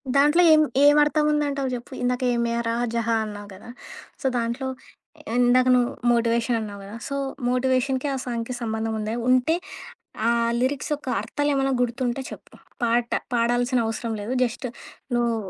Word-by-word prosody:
దాంట్లో 295 Hz, +5 st, +5 dB
ఏం 310 Hz, -, +6 dB, 0.2 s
ఏమర్థం 295 Hz, +1 st, +5 dB
ఉందంటావు 285 Hz, -3 st, 0 dB
జెప్పు. 245 Hz, +2 st, -6 dB
ఇందాక 250 Hz, 0 st, 0 dB
'యే 240 Hz, -, +1 dB
మేరా 235 Hz, 0 st, -1 dB, 0.2 s
జహా' 230 Hz, -1 st, +1 dB
అన్నావు 205 Hz, -1 st, -8 dB
గదా! 190 Hz, +5 st, -13 dB, 0.5 s
సో, -, -, -8 dB
దాంట్లో 235 Hz, +3 st, -2 dB, 0.7 s
ఇందాక 250 Hz, +1 st, +4 dB
నువ్వు 245 Hz, -1 st, +2 dB, 0.2 s
మోటివేషన్ 235 Hz, 0 st, +1 dB
అన్నావు 205 Hz, -2 st, -7 dB
గదా! 200 Hz, +3 st, -9 dB
సో, 280 Hz, -, -4 dB, 0.3 s
మోటివేషన్‌కి 260 Hz, +2 st, +1 dB
ఆ -, -, -1 dB
సాంగ్‌కి 235 Hz, 0 st, -3 dB
సంబంధం 220 Hz, -1 st, -2 dB
ఉందా? 215 Hz, +1 st, -3 dB, 0.2 s
ఉంటే 255 Hz, +6 st, +3 dB, 0.7 s
ఆ -, -, +4 dB, 0.3 s
లిరిక్స్ 260 Hz, +3 st, -1 dB
యొక్క 290 Hz, -2 st, -8 dB
అర్థాలేమన్నా 270 Hz, +4 st, 0 dB
గుర్తుంటే 245 Hz, +1 st, -1 dB
చెప్పు -, -, -12 dB, 0.3 s
పాట 235 Hz, 0 st, +1 dB, 0.2 s
పాడాల్సిన 245 Hz, +2 st, +1 dB
అవసరం 225 Hz, +1 st, -3 dB
లేదు. 210 Hz, +4 st, -4 dB
జస్ట్ 250 Hz, +1 st, -1 dB, 0.5 s
నువ్వు 235 Hz, -1 st, +1 dB
245 Hz, 145 wpm, -24 LUFS, 230-270 Hz, 0.7 s, ఏం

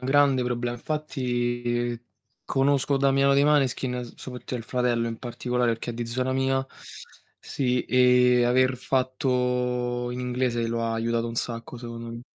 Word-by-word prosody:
grande 135 Hz, -1 st, +4 dB
problem 120 Hz, 0 st, -2 dB
infatti 120 Hz, -4 st, -2 dB, 0.5 s
conosco 140 Hz, +1 st, +2 dB
Damiano 135 Hz, 0 st, +3 dB
dei 140 Hz, +1 st, +4 dB
Maneskin, 130 Hz, -4 st, +1 dB
soprattutto 125 Hz, 0 st, -6 dB
il 115 Hz, -, -7 dB
fratello, 120 Hz, -2 st, 0 dB
in 115 Hz, -1 st, -4 dB
particolare 125 Hz, 0 st, -1 dB
perché 115 Hz, +1 st, -3 dB
è -, -, -4 dB
di 120 Hz, 0 st, -3 dB
zona 130 Hz, +3 st, -2 dB
mia. 135 Hz, 0 st, +1 dB, 0.7 s
Sì 125 Hz, -2 st, -1 dB
e 125 Hz, -1 st, +4 dB
aver 130 Hz, +1 st, +3 dB
fatto 125 Hz, -1 st, 0 dB
in 125 Hz, -, -5 dB
inglese 125 Hz, -2 st, -1 dB
lo 115 Hz, 0 st, -2 dB
aiutato 115 Hz, +1 st, -1 dB
un 115 Hz, -, -6 dB
sacco 115 Hz, +1 st, -4 dB
secondo 115 Hz, -1 st, -7 dB
m 115 Hz, 0 st, -7 dB
125 Hz, 140 wpm, -26 LUFS, 120-130 Hz, 0.7 s, grande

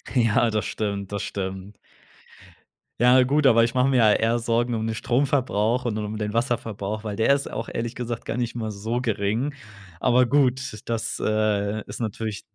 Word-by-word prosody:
Ja, 115 Hz, -1 st, +3 dB
das 105 Hz, -1 st, -1 dB
stimmt, 100 Hz, -2 st, -3 dB
das 100 Hz, -1 st, -3 dB
stimmt. 95 Hz, +1 st, -5 dB, 1.2 s
Ja, 125 Hz, +2 st, +6 dB
gut, 140 Hz, +2 st, +3 dB
aber 115 Hz, -2 st, +6 dB
ich 115 Hz, -, 0 dB
mache 130 Hz, +1 st, +3 dB
mir 135 Hz, -, +2 dB
ja 110 Hz, -3 st, +6 dB
eher 115 Hz, +3 st, +2 dB
Sorgen 120 Hz, +1 st, 0 dB
um 110 Hz, 0 st, -2 dB
den 115 Hz, -, -1 dB
Stromverbrauch 125 Hz, -2 st, +1 dB
und 110 Hz, -3 st, -1 dB
um 105 Hz, 0 st, -4 dB
den 105 Hz, -1 st, -3 dB
Wasserverbrauch, 115 Hz, -3 st, -2 dB
weil 105 Hz, -2 st, -4 dB
der 110 Hz, +6 st, +3 dB
ist 140 Hz, 0 st, -1 dB
auch, -, -, -4 dB
ehrlich 115 Hz, +1 st, -4 dB
gesagt, 120 Hz, -1 st, -5 dB
gar 115 Hz, -, -3 dB
nicht 120 Hz, -1 st, -2 dB
mal 110 Hz, -2 st, -3 dB
so 110 Hz, +4 st, -3 dB
gering. 115 Hz, +4 st, -1 dB, 0.5 s
Aber 125 Hz, +3 st, +3 dB
gut, 130 Hz, -1 st, +3 dB, 0.2 s
das, 115 Hz, -1 st, -3 dB
äh, 110 Hz, -1 st, 0 dB
ist 100 Hz, +1 st, -7 dB
natürlich 110 Hz, -2 st, -4 dB
115 Hz, 180 wpm, -24 LUFS, 105-125 Hz, 1.2 s, Ja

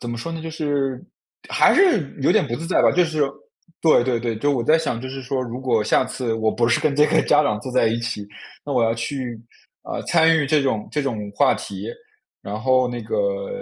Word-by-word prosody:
怎 120 Hz, -, -5 dB
么 120 Hz, -, -5 dB
说 165 Hz, +7 st, -5 dB
呢， 160 Hz, -1 st, -6 dB
就 165 Hz, -, -5 dB
是 145 Hz, -5 st, -2 dB, 0.5 s
还 -, -, +4 dB
是 340 Hz, -, +3 dB
有 135 Hz, -, +3 dB
点 -, -, +3 dB
不 120 Hz, -, -2 dB
自 165 Hz, -, -6 dB
在 180 Hz, -, +2 dB
吧， -, -, +5 dB
就 180 Hz, 0 st, +3 dB
是 155 Hz, -2 st, -1 dB, 0.6 s
对 160 Hz, -6 st, +4 dB
对 120 Hz, -1 st, 0 dB
对。 115 Hz, -1 st, -2 dB
就 145 Hz, +7 st, 0 dB
我 125 Hz, -5 st, 0 dB
在 160 Hz, -, +5 dB
想 145 Hz, -7 st, -2 dB
就 130 Hz, -, -6 dB
是 135 Hz, 0 st, -7 dB
说 130 Hz, +1 st, -2 dB
如 125 Hz, +1 st, -6 dB
果 115 Hz, -5 st, +1 dB
下 -, -, +2 dB
次 120 Hz, -3 st, -3 dB
我 110 Hz, -1 st, 0 dB
不 115 Hz, -, 0 dB
是 115 Hz, -, +2 dB
跟 145 Hz, -2 st, 0 dB
这 150 Hz, 0 st, +5 dB
个 -, -, +3 dB
家 150 Hz, 0 st, +4 dB
长 105 Hz, -5 st, -1 dB
坐 130 Hz, -, -6 dB
在 125 Hz, -2 st, +2 dB
一 115 Hz, +1 st, 0 dB
起， 105 Hz, -3 st, -4 dB, 0.4 s
那 145 Hz, -, -4 dB
我 125 Hz, -3 st, +2 dB
要 115 Hz, 0 st, +2 dB
去， 120 Hz, 0 st, -4 dB, 0.4 s
呃， -, -, -5 dB
参 165 Hz, 0 st, +4 dB
与 145 Hz, -, 0 dB
这 150 Hz, 0 st, +2 dB
种 110 Hz, -6 st, -1 dB
这 150 Hz, -, -1 dB
种 110 Hz, -7 st, -4 dB
话 -, -, +3 dB
题， -, -, -7 dB, 0.5 s
然 105 Hz, +1 st, -5 dB
后 130 Hz, 0 st, +2 dB
那 120 Hz, -1 st, -5 dB
个 -, -, -2 dB
130 Hz, 260 characters per minute, -22 LUFS, 115-155 Hz, 0.6 s, 吧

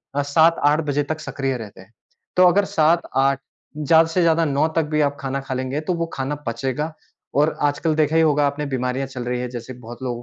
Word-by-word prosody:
अ, 145 Hz, -, +2 dB
7-8 150 Hz, +1 st, +3 dB
बजे 145 Hz, +1 st, +1 dB
तक 155 Hz, -, -3 dB
सक्रिय 135 Hz, -2 st, -3 dB
रहते 105 Hz, -3 st, -10 dB
हैं। 95 Hz, -, -19 dB, 0.5 s
तो 185 Hz, -, +7 dB
अगर 200 Hz, +3 st, +3 dB
7-8 150 Hz, -5 st, +2 dB, 0.4 s
ज़्यादा 160 Hz, +2 st, +4 dB
से 180 Hz, -, +1 dB
ज़्यादा 165 Hz, 0 st, +3 dB
9 145 Hz, +2 st, +1 dB
तक 165 Hz, -, +3 dB
भी 155 Hz, -, +3 dB
आप 145 Hz, -, -14 dB
खाना 135 Hz, 0 st, -3 dB
खा 135 Hz, -1 st, -5 dB
लेंगे 130 Hz, +3 st, -2 dB
तो -, -, +3 dB
वो 170 Hz, -1 st, -1 dB
खाना 135 Hz, +2 st, -2 dB
पचेगा 135 Hz, +7 st, -2 dB, 0.4 s
और 150 Hz, +2 st, +2 dB, 0.2 s
आजकल 155 Hz, +1 st, -1 dB
देखा 155 Hz, 0 st, +1 dB
ही 165 Hz, -, +5 dB
होगा 150 Hz, -2 st, +3 dB
आपने 145 Hz, +1 st, -3 dB
बीमारियाँ 130 Hz, 0 st, -2 dB
चल 130 Hz, -2 st, -6 dB
रही 125 Hz, 0 st, -2 dB
हैं, 125 Hz, -, -4 dB
जैसे 120 Hz, +1 st, -7 dB
बहुत 120 Hz, 0 st, -11 dB
लोगों 120 Hz, -2 st, -3 dB
145 Hz, 215 wpm, -21 LUFS, 130-160 Hz, 0.5 s, तो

